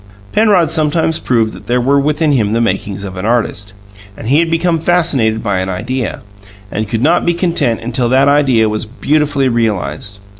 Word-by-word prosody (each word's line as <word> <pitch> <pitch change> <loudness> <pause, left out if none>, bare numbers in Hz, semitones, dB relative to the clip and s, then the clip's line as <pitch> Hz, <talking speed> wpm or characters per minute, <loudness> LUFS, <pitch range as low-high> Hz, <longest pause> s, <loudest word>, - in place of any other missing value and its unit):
Penrod 200 -7 +3
sometimes 160 +1 +1
proved 115 -3 0
that - - -13
there 125 +1 +1
were 140 +3 +2
within 150 +2 +1
him 110 -6 +1
the 115 - +1
makings 100 -2 -2
of 95 -1 -7
an 95 - -4
artist; 105 -3 -1 0.5
he 140 +7 +3
had 165 0 +1
become 165 0 +1
fascinated 150 -10 +1
by 100 -4 0
an 95 +1 -3
idea, 120 +6 -4 0.5
and 105 0 -3
could 115 +2 -1
not 170 +4 +3
be 170 - +1
content 165 -10 0
until 120 +1 -1
that 135 +2 +3
idea 135 -6 +3
was 105 0 -2
beautifully 145 +3 0
realized. 110 -3 -2
125 Hz, 180 wpm, -14 LUFS, 110-155 Hz, 0.5 s, Penrod